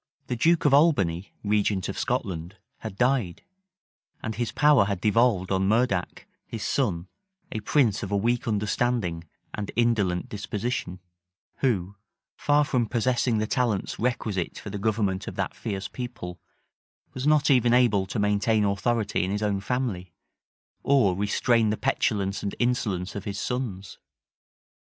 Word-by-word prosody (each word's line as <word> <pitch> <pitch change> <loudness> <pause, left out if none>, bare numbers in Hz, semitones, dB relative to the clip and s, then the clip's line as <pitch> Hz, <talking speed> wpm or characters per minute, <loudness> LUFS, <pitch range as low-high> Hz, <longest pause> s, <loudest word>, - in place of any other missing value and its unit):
The 125 - -3
duke 165 +8 +2
of 145 - +4
Albany, 100 - +3
regent 105 -2 +1
of - - -4
Scotland, 90 +2 -3 0.2
had 105 -3 -7
died: 125 -8 +1 0.8
and 110 - -3
his 115 +1 -2
power 145 -7 +5
had 100 -2 -2
devolved 105 -2 +2
on 95 0 +1
Murdac, 110 -5 0 0.2
his - - -6
son, 85 +2 -1 0.4
a 110 - -3
prince 110 -1 +2
of 100 - -5
a 100 - +2
weak 120 +4 0
understanding 105 -5 -1 0.3
and 105 -1 -4
indolent 105 -7 +1
disposition; 100 -2 -4 0.6
who, 100 -7 -1 0.4
far 145 0 +3
from 125 -5 0
possessing 120 0 +1
the 110 - 0
talents 115 -4 -1
requisite 110 -6 -2
for 105 - -7
the 105 - -4
government 100 -3 0
of - - -6
that - - -3
fierce 100 -3 -4
people, 120 -9 -7 0.7
was 130 +2 -3
not 150 -1 +4
even 120 -3 +4
able 115 -6 +3
to 100 - -4
maintain 105 +1 +2
authority 100 +2 0
in 95 - -2
his 105 +2 -2
own 100 -2 0
family, 100 -7 -3 0.7
or 125 -10 +3
restrain 110 +3 +2
the 105 - -1
petulance 100 -2 0
and 100 - -3
insolence 105 -7 -1
of 100 - -6
his 100 - -4
sons. 115 -7 -4
105 Hz, 145 wpm, -26 LUFS, 95-120 Hz, 0.8 s, power